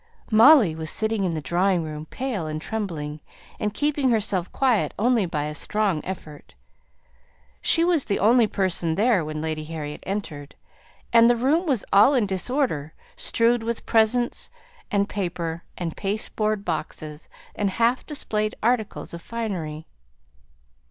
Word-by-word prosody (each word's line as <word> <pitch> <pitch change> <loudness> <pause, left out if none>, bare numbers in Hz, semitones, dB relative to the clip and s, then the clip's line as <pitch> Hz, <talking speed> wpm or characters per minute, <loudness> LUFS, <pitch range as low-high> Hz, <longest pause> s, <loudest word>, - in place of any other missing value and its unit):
Molly 225 - +7
was 160 0 -4
sitting 220 0 0
in 170 -3 -1
the 155 - -3
drawing 175 +3 +1
room 155 0 -7
pale 230 -10 -3
and 155 0 -3
trembling, 155 -7 -4 0.4
and 210 - -1
keeping 290 +2 0
herself 200 -6 0
quiet 255 -5 +1
only 230 -3 +2
by 150 -3 -2
a 150 +1 -4
strong 195 0 0
effort. 155 -6 -8 1.1
She 330 - +3
was 340 -5 +2
the 200 - 0
only 230 +2 +4
person 180 -5 0
there 215 -3 +3
when 155 0 -5
Lady 155 -1 -2
Harriet 150 -2 -6
entered: 160 -8 -5 0.6
the 235 +1 +6
room 295 +9 +1
was 260 -8 +1
all 210 +8 +6
in 240 -5 +3
disorder, 190 - -1 0.2
strewed 235 +1 +2
with 230 0 -4
presents 235 +2 +2 0.4
and 200 -1 +1
paper, 170 -4 -3 0.2
and 170 -3 -4
pasteboard 210 0 -2
boxes, 155 -2 -5 0.2
and 205 -1 -1
half 230 +5 +1
displayed 215 -8 -2
articles 225 -6 -1
of 170 - -7
finery. 175 -10 -4
200 Hz, 140 wpm, -24 LUFS, 160-230 Hz, 1.1 s, Molly